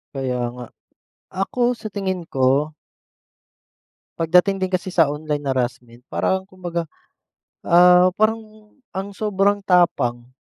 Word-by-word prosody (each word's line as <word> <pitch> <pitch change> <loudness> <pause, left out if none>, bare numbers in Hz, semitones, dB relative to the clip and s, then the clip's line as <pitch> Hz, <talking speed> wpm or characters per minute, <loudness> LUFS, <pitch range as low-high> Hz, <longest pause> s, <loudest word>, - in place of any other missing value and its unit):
Kaya 130 -2 -2
nga. 125 0 -8 0.8
Ako 245 +4 0
sa 220 - -9
tingin 190 -3 -3
ko 135 +3 +1 1.5
pagdating 180 +4 +3
din 185 -1 -3
kasi 185 +1 -1
sa 165 -5 +2
online 150 -1 -4
harassment, 125 -2 -3
parang 190 0 0
kumbaga 175 -3 -5 0.7
ah, 180 +1 +6
parang 215 -1 -2 0.2
ang 195 +1 -6
sobrang 205 0 0
tapang. 155 -11 +1
180 Hz, 110 wpm, -21 LUFS, 145-195 Hz, 1.5 s, ah